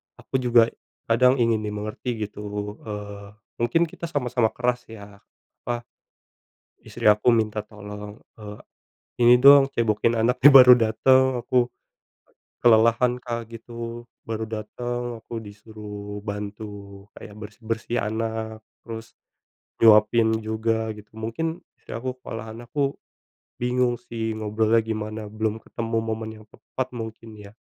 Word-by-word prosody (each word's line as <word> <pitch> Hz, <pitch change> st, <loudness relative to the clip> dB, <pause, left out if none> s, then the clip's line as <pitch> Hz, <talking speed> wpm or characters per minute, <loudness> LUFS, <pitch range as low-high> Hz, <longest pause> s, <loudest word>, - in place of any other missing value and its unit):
aku 130 Hz, -, -3 dB
juga 120 Hz, -2 st, +4 dB, 0.4 s
kadang 125 Hz, +3 st, +5 dB
ingin 115 Hz, -2 st, +2 dB
dimengerti 105 Hz, +3 st, -4 dB
gitu. 105 Hz, 0 st, -6 dB
Eee, 105 Hz, -1 st, -7 dB, 0.2 s
mungkin 120 Hz, +9 st, +2 dB
kita 170 Hz, +1 st, -5 dB
sama-sama 125 Hz, -6 st, +1 dB
keras 125 Hz, 0 st, -1 dB
ya, 100 Hz, -2 st, -12 dB, 0.5 s
apa, 120 Hz, -1 st, -3 dB, 1.0 s
istri -, -, -5 dB
aku 105 Hz, +4 st, +4 dB
minta 110 Hz, -1 st, 0 dB
tolong, 105 Hz, 0 st, -10 dB, 0.2 s
eee, 105 Hz, -1 st, -9 dB, 0.7 s
"Ini 120 Hz, +1 st, +8 dB
dong, 140 Hz, 0 st, +8 dB
cebokin 115 Hz, -1 st, +1 dB
anaknya," 125 Hz, +5 st, +6 dB
baru 125 Hz, -2 st, +10 dB
datang, 130 Hz, +3 st, +3 dB
aku 125 Hz, -1 st, +2 dB, 0.9 s
kelelahan, 115 Hz, +2 st, +4 dB
Kak, 120 Hz, -1 st, -4 dB
gitu. 115 Hz, 0 st, -8 dB, 0.2 s
Baru 110 Hz, 0 st, -3 dB
datang 120 Hz, +2 st, -5 dB
aku 115 Hz, -, -7 dB
disuruh 105 Hz, -1 st, -9 dB
bantu 100 Hz, -1 st, -7 dB
kayak 105 Hz, -, -11 dB
bersih-bersih 110 Hz, +2 st, -4 dB
anak, 110 Hz, 0 st, -3 dB, 0.2 s
terus 115 Hz, -1 st, -9 dB, 0.7 s
nyuapin 110 Hz, +1 st, +5 dB
juga 110 Hz, +1 st, -1 dB
gitu. 105 Hz, 0 st, -14 dB
Mungkin 160 Hz, +10 st, -3 dB, 0.2 s
istri -, -, -13 dB
aku 130 Hz, +2 st, -4 dB
kalau 115 Hz, -1 st, -6 dB
anakku 120 Hz, +5 st, -3 dB, 0.6 s
bingung 125 Hz, 0 st, +1 dB
sih 115 Hz, -2 st, -4 dB
ngobrolnya 110 Hz, +1 st, +2 dB
gimana. 110 Hz, 0 st, -4 dB
Belum 110 Hz, 0 st, -2 dB
ketemu 115 Hz, 0 st, -3 dB
momen 110 Hz, 0 st, -4 dB
yang -, -, -17 dB
tepat 130 Hz, -1 st, -6 dB
mungkin 110 Hz, -1 st, -7 dB
ya. 100 Hz, 0 st, -12 dB
115 Hz, 120 wpm, -24 LUFS, 105-120 Hz, 1.0 s, baru